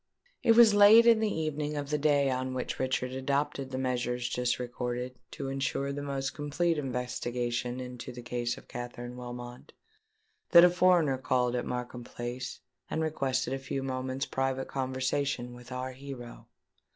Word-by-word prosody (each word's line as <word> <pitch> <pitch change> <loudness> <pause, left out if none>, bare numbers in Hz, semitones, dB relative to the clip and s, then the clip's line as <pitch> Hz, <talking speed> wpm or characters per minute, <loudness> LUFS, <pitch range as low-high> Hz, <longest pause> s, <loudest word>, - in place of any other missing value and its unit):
It 230 - +5
was 230 -2 +8
late 205 +3 +8
in 230 -2 +6
the 220 -1 +1
evening 150 -1 -2
of 145 0 -4
the 150 - +2
day 140 -2 +3
on 130 0 -2
which 125 - -3
Richard 130 -1 0
adopted 135 +1 -1
the 130 - -4
measures 125 -1 -1
just 125 +1 0
recorded 125 0 -4 0.2
to 140 - -5
ensure 135 +1 -1
the 145 - -4
most 135 -1 -3
complete 155 +3 0
investigation 125 -1 -2
into 125 -1 -7
the 120 0 -9
case 120 0 -2
of - - -14
Katherine 120 0 -6
Wilmot, 120 0 -8 0.8
that 170 - +11
a 180 - +5
foreigner 175 -7 +4
called 125 -1 +1
at 125 - -2
Markham 125 0 -4
Place 120 +2 -6 0.3
and 160 - -1
requested 135 -4 -1
a 135 - -2
few 135 0 -4
moments' 130 0 -2
private 135 0 -1
conversation 130 -1 -1
with 120 0 -12
our 130 +1 -3
hero. 130 -2 -9
130 Hz, 165 wpm, -30 LUFS, 125-140 Hz, 0.8 s, that